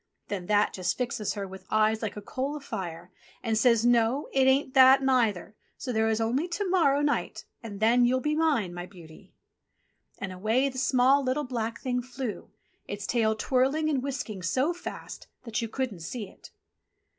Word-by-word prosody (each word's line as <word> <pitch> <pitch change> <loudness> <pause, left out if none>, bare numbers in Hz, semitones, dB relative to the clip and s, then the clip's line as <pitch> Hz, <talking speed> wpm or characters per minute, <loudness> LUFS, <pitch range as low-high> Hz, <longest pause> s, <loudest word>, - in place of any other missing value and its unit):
Then 190 -4 -4
That 210 0 +2
just 180 -2 -2
fixes 235 -5 -2
her 200 -1 -4
with 190 0 -11
eyes 215 0 +2
like 215 -2 -4
a 205 - -7
coal 270 +7 -3
a - - -5
fire, 180 - -6 0.3
and 225 -2 0
says, 230 0 +3
"No, 240 +3 +2
it 265 -1 +4
ain't 265 0 +2
that 265 0 +7
neither, 225 -7 +1 0.2
so 250 - -4
there 220 0 +2
is 220 0 0
only 245 +9 0
to 375 +3 -3
morrow 310 -7 +3
night 290 0 -1 0.2
and 205 -4 -8
then 235 +3 +4
you'll 250 +2 +3
be 300 +4 -1
mine, 290 - +1
my 175 0 -6
beauty." 170 -4 -15 0.9
And 195 -1 -5
away 220 +9 +1
the 260 -1 -5
small, 260 +2 +3
little, 260 +3 0
black 230 -3 -3
Thing 250 -2 -1
flew, 250 -4 -6 0.4
its 200 0 -5
tail 220 -2 +1
twirling 270 +7 +1
and 270 -3 0
whisking 250 -7 -4
so 260 - +1
fast 350 - -8 0.2
that 230 -3 -3
you 230 - -2
couldn't 245 -6 -3
see 210 +6 -6
it. - - -16
240 Hz, 185 wpm, -27 LUFS, 210-265 Hz, 0.9 s, that